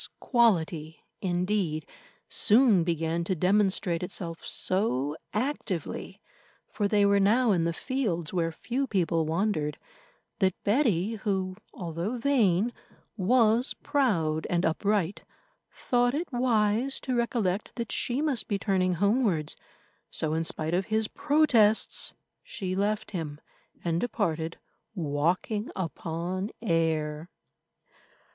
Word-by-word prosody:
This - - -5
quality, 170 - +1 0.2
indeed, 180 -3 0 0.4
soon 220 -5 +4
began 165 0 -1
to 185 - 0
demonstrate 185 -1 +2
itself 175 -2 -5
so 150 - -1 0.2
actively, 210 - -3 0.5
for 205 - 0
they 205 0 +3
were 200 0 +4
now 225 +4 +4
in 170 -4 +2
the 170 - +1
fields 185 - -2
where 165 -2 0
few 250 +10 -2
people 165 -6 +1
wandered, 160 -4 0 0.6
that 190 -3 +2
Betty, 220 - +2
who 190 -2 -2 0.2
although 175 +6 -4
vain 235 -5 +2 0.4
was 230 +4 +3
proud 165 - +1
and 175 0 +1
upright, 195 +2 0 0.5
thought 245 +1 +1
it 325 -1 -4
wise 240 +1 +1
to 260 - -2
recollect 235 -5 -1
that 235 -2 -4
she 255 +4 0
must 280 -7 0
be 205 - 0
turning 185 -3 +1
homewards. 200 - +1 0.5
So, 155 -1 -2
in 160 +1 0
spite 160 0 -2
of 185 +2 0
his 220 -1 +1
protests, 255 -9 +3 0.3
she 195 - -4
left 205 +2 -1
him 155 -6 -4 0.4
and 170 0 0
departed, 165 -9 -1 0.4
walking 175 +7 -1
upon 180 +2 -3
air. 160 -4 0
195 Hz, 115 wpm, -28 LUFS, 165-225 Hz, 0.6 s, soon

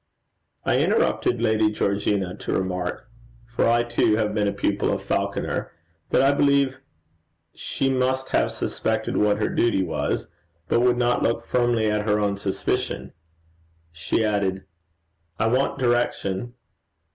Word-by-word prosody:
I - - +2
interrupt - - +1
Lady 110 0 +2
Georgina 100 -2 -1
to - - -4
remark 90 -1 -2 0.4
for 115 0 0
I 120 0 +3
too 120 -2 +2
have 105 -1 0
been 105 -1 +1
a - - +1
pupil 100 0 0
of - - -2
Falconer - - -2 0.4
that 130 - +3
I 135 - +5
believe 140 -2 +2 0.7
she 135 - -2
must 130 0 0
have - - +2
suspected - - -2
what 105 -1 +3
her 110 - 0
duty 115 -5 +1
was, 75 -4 -2 0.4
and 120 - +3
would 125 -1 +3
not 120 0 +1
look 115 0 0
firmly 120 -3 +1
at 105 0 -1
her 105 0 +3
own 100 -1 0
suspicion. 100 -1 -2 0.8
She 85 +7 -1
added: 95 -2 -1 0.7
'I 110 - +1
want 130 +4 +1
direction.' 120 -3 -1
110 Hz, 140 wpm, -24 LUFS, 100-120 Hz, 0.8 s, I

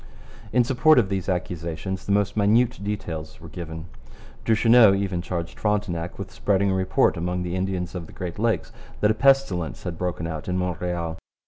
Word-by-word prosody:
In 125 - +4
support 135 +5 +4
of 110 -6 +3
these 95 -1 -2
accusations 90 +1 -3
the - - 0
most 105 0 +1
minute 110 +2 +2
details 80 -7 -4
are - - -11
given. 80 -2 -7 0.6
Duchesneau 115 -2 +6
even 95 -3 -1
charged 85 -1 -5
Frontenac 100 -5 -1
with 100 -1 -7
spreading 100 -1 +1
a - - +1
report 95 -2 +2
among 90 +1 -2
the 90 0 -3
Indians 95 -2 -2
of 85 -3 -6
the - - -13
Great 90 +1 -6
Lakes 115 0 0 0.3
that 105 - +4
a - - +3
pestilence 135 - +2
had 85 -3 -5
broken 90 -2 -2
out 80 -2 -5
in 90 0 -1
Montreal. 90 -2 -2
95 Hz, 180 wpm, -24 LUFS, 85-105 Hz, 0.6 s, Duchesneau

